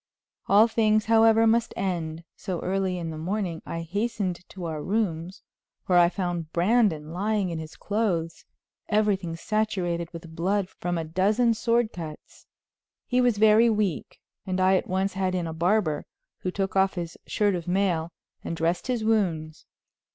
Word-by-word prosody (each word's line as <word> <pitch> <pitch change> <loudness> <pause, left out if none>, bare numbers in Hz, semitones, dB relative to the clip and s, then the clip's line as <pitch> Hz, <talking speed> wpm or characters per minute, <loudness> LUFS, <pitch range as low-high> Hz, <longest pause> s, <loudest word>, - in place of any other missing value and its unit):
All 210 +3 +6
things, 215 -2 +2
however, 225 0 +5
must 230 +1 +2
end, 170 -4 -2
so 180 -3 -4
early 190 -1 -1
in 165 -2 -4
the 155 - -6
morning 180 -1 -2
I 165 - -4
hastened 200 +1 -2
to 185 -2 -7
our 155 -2 -4
rooms, 185 -1 -2 0.4
where 180 -1 +4
I 170 0 +6
found 175 -4 -3
Brandon 175 -5 +2
lying 200 0 0
in 165 - -3
his 160 0 -8
clothes, 195 -6 -1 0.5
everything 200 -5 +1
saturated 180 -4 -1
with 165 -1 -10
blood 190 +3 0
from 175 -1 -3
a 165 - -2
dozen 205 +9 +2
sword 235 0 +1
cuts. 160 -3 -9 0.6
He 250 0 +2
was 245 -4 +2
very 220 +2 +6
weak, 210 -7 -1 0.2
and 185 0 -2
I 185 +1 +4
at - - 0
once 190 +1 0
had 185 -1 -1
in 175 -2 -1
a 160 - -4
barber, 170 -2 +1 0.3
who 185 - -3
took 195 +1 -2
off 195 0 +3
his 170 -2 -5
shirt 205 -1 +1
of 175 -2 -4
mail 175 -3 0 0.3
and 165 - -4
dressed 170 +6 0
his 245 -3 -1
wounds. 170 -8 0
185 Hz, 165 wpm, -26 LUFS, 170-215 Hz, 0.6 s, All